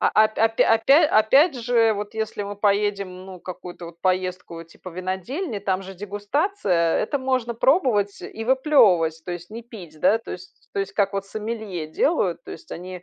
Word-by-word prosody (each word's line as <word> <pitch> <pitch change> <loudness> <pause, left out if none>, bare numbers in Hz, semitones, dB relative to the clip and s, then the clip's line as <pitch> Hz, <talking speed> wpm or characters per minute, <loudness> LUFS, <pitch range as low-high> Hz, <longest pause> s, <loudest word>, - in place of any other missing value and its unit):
А, - - +3
а 215 - +7
опя 215 +1 +1
опя 225 0 +2
опя 270 +2 +5
опять 275 +9 +5
же, 235 -2 +2
вот 205 +1 -6
если 220 -1 -3
мы 200 0 -6
поедем, 200 -2 0
ну, 185 -2 -10
какую-то 180 -1 -8
вот 170 0 -13
поездку 185 -2 -2
типа 180 +2 -12
винодельни, 190 - -4
там 190 -1 -1
же 190 0 -9
дегустация, 205 - 0
это 280 +6 -1
можно 255 -3 -1
пробовать 235 - +2
и 225 - -7
выплевывать, 225 - +3
то 180 - -6
есть 175 +1 -8
не 230 +2 -7
пить, 180 -10 -12
да. 225 - +4
То - - -9
есть 185 +1 -12
то 200 - -1
есть 195 - -4
как 200 -1 +1
вот 195 0 -3
сомелье 215 -6 -5
делают, 180 - 0
то - - -10
есть 330 - -11
они 180 0 -8
205 Hz, 190 wpm, -23 LUFS, 185-230 Hz, -, а